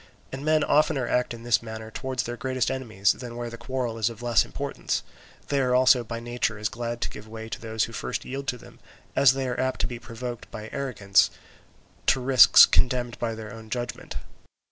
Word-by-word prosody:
And 135 +1 -6
men 155 0 +3
oftener 145 -3 +2
act 125 +1 +1
in 115 -1 -7
this 120 -1 +2
manner 110 -1 -8
towards 130 +2 -3
their 120 - -4
greatest 130 0 -1
enemies 110 -7 +1
than 120 -2 -7
where 120 -1 -5
the - - -6
quarrel 120 -2 -3
is 110 +1 +2
of 115 0 -10
less 120 -3 +4
importance; - - -3 0.5
they 140 - +1
are 125 -1 +2
also 125 -1 +5
by 115 +1 -5
nature 120 -2 -2
as 105 0 -1
glad 120 0 -4
to - - -1
give 105 - -10
way 110 0 -8
to - - -6
those 110 -1 -1
who 115 - -4
first - - -4
yield 135 +1 -5
to 125 - -1
them, - - -16 0.4
as 135 -2 +6
they 135 -1 -2
are 125 - -3
apt 130 0 -1
to - - +1
be 120 -1 -6
provoked 120 0 -7
by 110 0 -8
arrogance 105 -8 +2 0.8
to 130 - +4
risks 130 -2 +8
condemned 125 -1 +1
by 115 -1 -2
their 110 +1 -8
own 110 -1 -11
judgment. 120 0 -5
120 Hz, 210 wpm, -26 LUFS, 115-130 Hz, 0.8 s, risks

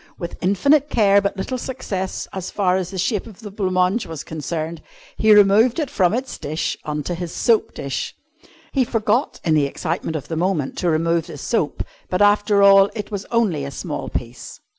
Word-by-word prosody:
With 170 -1 -7
infinite 280 +11 +3
care 200 -5 +4
but 200 0 -2
little 255 +7 -3
success 200 -8 -4
as 190 -1 -4
far 185 -3 +1
as 185 -2 -2
the 195 - -7
shape 195 +4 -1
of 215 -1 -13
the 210 -2 -8
blanc 195 -2 -2
mange 185 +5 +2
was 160 -2 -6
concerned, 160 +2 -4 0.3
he 220 - +3
removed 210 +3 +6
it 300 -5 -2
from 185 +2 +2
its 260 +1 -4
dish 155 +3 -2
on 150 -1 -3
to 175 - -3
his 170 -1 -5
soap 230 -2 +1
dish. 140 -1 -4 0.6
He 270 - +2
forgot, 235 +3 0
in 160 - +2
the 150 -2 +3
excitement 165 +3 -3
of 145 -2 -5
the 165 - -4
moment, 165 -4 -1
to 175 - +1
remove 165 +1 +1
the - - -8
soap, 160 - -1 0.3
but, 180 - 0
after 205 0 +4
all, 195 0 +7
it 210 0 -5
was 200 -1 -4
only 210 -11 +1
a 140 - -4
small 145 +2 -5
piece. 120 0 -6
190 Hz, 200 wpm, -21 LUFS, 160-210 Hz, 0.6 s, all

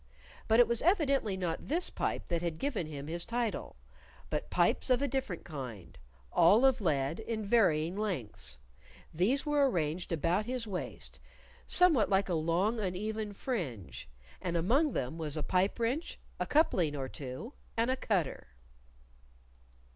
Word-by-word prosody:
But 225 +2 +4
it 240 - +7
was 235 -1 +1
evidently 280 - +2
not 175 -3 -3
this 340 +4 0
pipe - - -2
that 170 -2 0
had 170 -2 -2
given 245 - -2
him 145 -2 -6
his 170 +3 -3
title; 235 -2 -2 0.6
but - - -2
pipes - - +2
of 255 - +4
a 280 - 0
different 255 -10 -3
kind 125 - -7 0.4
all 200 +9 +6
of 260 -3 +4
lead, 150 -2 0
in 220 -1 -3
varying 180 -6 +3
lengths. 125 - -3 0.6
These 210 - +2
were 290 -2 +3
arranged 170 -2 -2
about 175 +6 +1
his 250 -2 -2
waist, 195 -4 -5 0.5
somewhat 325 - +4
like 195 -1 +2
a - - +1
long, 170 +8 +1
uneven 210 +2 -2
fringe. 155 - -4 0.3
And 175 -1 -1
among 265 - +2
them 135 +6 -3
was 155 -1 -2
a 155 - -1
pipe 185 - +1
wrench, 255 +9 -1 0.2
a - - -1
coupling 180 - +3
or 135 -2 -3
two, 135 - -7 0.2
and 230 +3 +2
a - - +2
cutter. 190 - -1
195 Hz, 155 wpm, -32 LUFS, 160-240 Hz, 0.6 s, it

